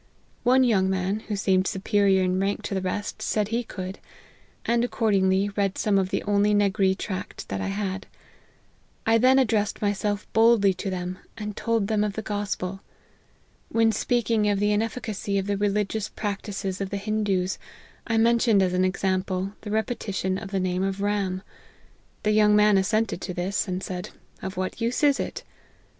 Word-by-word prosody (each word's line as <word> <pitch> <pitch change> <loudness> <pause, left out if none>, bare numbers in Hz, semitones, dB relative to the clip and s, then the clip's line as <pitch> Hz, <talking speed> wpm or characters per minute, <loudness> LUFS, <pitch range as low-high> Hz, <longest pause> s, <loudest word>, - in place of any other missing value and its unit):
One 255 +2 +4
young 195 -6 +3
man, 190 +2 0
who 210 - -1
seemed 190 -1 +2
superior 195 -1 +2
in 185 0 +1
rank 195 +1 -1
to - - -3
the 190 - -1
rest, 200 +2 -3
said 210 -1 0
he 230 +2 0
could, 190 -3 -7 0.7
and 235 0 +2
accordingly 200 -4 +2
read 200 -1 -1
some 200 -2 +2
of 185 -1 0
the - - -1
only 205 0 +2
N 205 0 +4
agree 190 -1 +2
tract 190 -1 -6
that 95 0 -3
I - - -2
had. 195 -1 -3 1.0
I 225 0 +4
then 260 +3 +5
addressed 220 -5 +1
myself 205 0 -1
boldly 225 -3 +5
to 195 +2 -4
them, 185 0 -4 0.2
and 210 -2 -5
told 230 -3 0
them 210 0 +1
of 210 -1 -1
the 220 - -5
gospel. 200 -2 -3 0.9
When 225 -1 +3
speak 235 +1 0
ing 210 -2 +3
of 205 - +2
the 205 +1 +2
inefficacy 215 -2 -1
of 195 - 0
the 205 0 0
religious 205 +1 0
practices 200 -2 -4
of 195 - -2
the 200 - -3
Hindoos, 200 -3 -1 0.5
I 225 - +1
mentioned 230 -3 +4
as 180 -1 0
an 180 0 +2
example, 185 0 -1
the 210 - -7
re 220 +1 +2
petition 195 -5 -3
of 195 - -7
the 195 -1 -1
name 185 0 0
of 195 0 -1
Ram. 200 -2 -1 0.8
The 210 - +2
young 210 0 +5
man 210 -1 +5
assented 215 0 0
to 180 - -5
this; 185 +4 -1
and 185 0 -3
said 180 -1 -5 0.2
' - - -31
of 190 -1 -5
what 185 +4 -3
use 235 +6 0
is 285 -2 +4
it - - -4
!' - - -32
200 Hz, 185 wpm, -25 LUFS, 190-215 Hz, 1.0 s, then